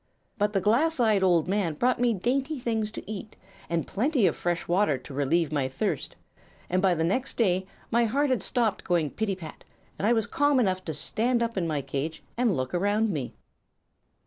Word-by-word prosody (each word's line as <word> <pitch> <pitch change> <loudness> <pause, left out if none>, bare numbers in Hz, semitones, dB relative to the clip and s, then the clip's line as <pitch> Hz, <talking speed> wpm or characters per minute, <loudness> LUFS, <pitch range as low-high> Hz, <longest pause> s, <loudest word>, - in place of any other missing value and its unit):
But 205 +1 +1
the 195 - +1
glass 265 - +2
eyed 215 -4 +3
old 175 -3 +3
man 190 -5 0
brought 250 +10 +1
me 245 -1 +4
dainty 270 - -1
things 225 -3 -1
to - - -8
eat, 215 0 -7 0.3
and 170 -1 0
plenty 255 +1 +1
of 170 - +2
fresh 175 0 -2
water 175 -5 +2
to 130 +2 -11
relieve 145 +3 +1
my 140 -3 0
thirst, 130 - -3 0.6
and 185 +1 +2
by 185 -2 +3
the 160 - 0
next 225 +11 -1
day 190 -4 +2 0.2
my 235 +1 +3
heart 275 +5 +1
had 255 - +1
stopped 230 -5 0
going 170 -5 +1
pitty 215 -3 -1
pat 165 -4 -10 0.4
and 200 - +1
I 235 - +5
was 225 -2 +1
calm 290 -1 +2
enough 185 -5 +1
to 160 - -4
stand 235 - 0
up 230 0 -2
in 180 -4 0
my 150 -3 -1
cage 155 +5 -4
and 235 - +1
look 130 0 -3
around 205 +4 +1
me. 140 -8 -4
200 Hz, 200 wpm, -27 LUFS, 170-235 Hz, 0.6 s, I